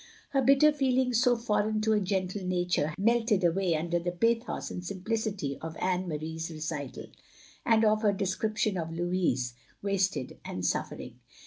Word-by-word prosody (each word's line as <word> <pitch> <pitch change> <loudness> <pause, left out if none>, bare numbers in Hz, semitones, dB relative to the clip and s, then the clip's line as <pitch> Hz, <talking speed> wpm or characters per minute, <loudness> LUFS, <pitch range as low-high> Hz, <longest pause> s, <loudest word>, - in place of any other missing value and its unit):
Her 275 - +2
bitter 275 +3 +6
feelings, 255 -4 +2
so 245 -2 +4
foreign 215 -2 0
to 220 0 +2
a 210 - +3
gentle 190 0 -2
nature, 180 -4 0
had 155 - -5
aU - - -6
melted 225 -3 +3
away 175 0 +2
under 170 +2 0
the 175 +1 -2
pathos 230 +6 0
and 180 - -5
simpli 190 +5 -3
city 200 -11 -3
of 160 0 -6
Anne 185 0 0
Marie's 160 +1 -4
recital, 155 -4 -5 0.6
and 225 -1 +5
of 215 0 +3
her 210 -2 +4
description 200 +1 -1
of 165 -1 -4
Louis, 165 -8 0 0.3
wasted 195 -1 -1
and - - -4
suffering. - - -3
190 Hz, 170 wpm, -29 LUFS, 170-220 Hz, 0.6 s, bitter